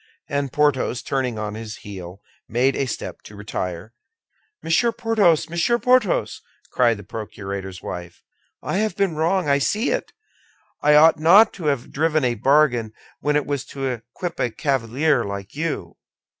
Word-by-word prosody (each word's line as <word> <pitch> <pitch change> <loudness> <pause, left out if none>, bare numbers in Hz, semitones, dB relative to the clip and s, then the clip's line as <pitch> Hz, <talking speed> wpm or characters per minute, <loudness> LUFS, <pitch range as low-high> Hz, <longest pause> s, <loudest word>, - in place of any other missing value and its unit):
And 140 -2 -2
Porthos, 140 -4 +1
turning 130 -4 -1
on 105 -1 -4
his 110 0 -7
heel, 95 -1 -9 0.3
made 125 +4 +2
a 135 - -1
step 115 - -6
to 105 - -13
retire. 100 -1 -5 0.7
"Monsieur 230 +9 +2
Porthos! 210 -10 +2
Monsieur 170 +8 +1
Porthos!" 250 -5 +2 0.3
cried 120 -3 +3
the 105 - -10
procurator's 100 -2 -7
wife. 85 -1 -7 0.4
"I - - -1
have 215 -3 0
been 195 -5 0
wrong; 170 +2 +1
I 140 0 +3
see 215 - 0
it. - - -2 0.7
I 150 0 +5
ought 160 +1 +6
not 195 +8 +6
to 175 - -8
have 140 -5 -1
driven 155 0 +1
a 120 - +2
bargain 120 -2 +2 0.3
when 150 0 0
it 150 - +1
was 140 -2 -2
to 135 -1 -6
equip 125 +8 -5
a 125 - +1
cavalier 135 +2 0
like 100 -1 -6
you." 160 +1 -4
140 Hz, 155 wpm, -22 LUFS, 110-165 Hz, 0.7 s, ought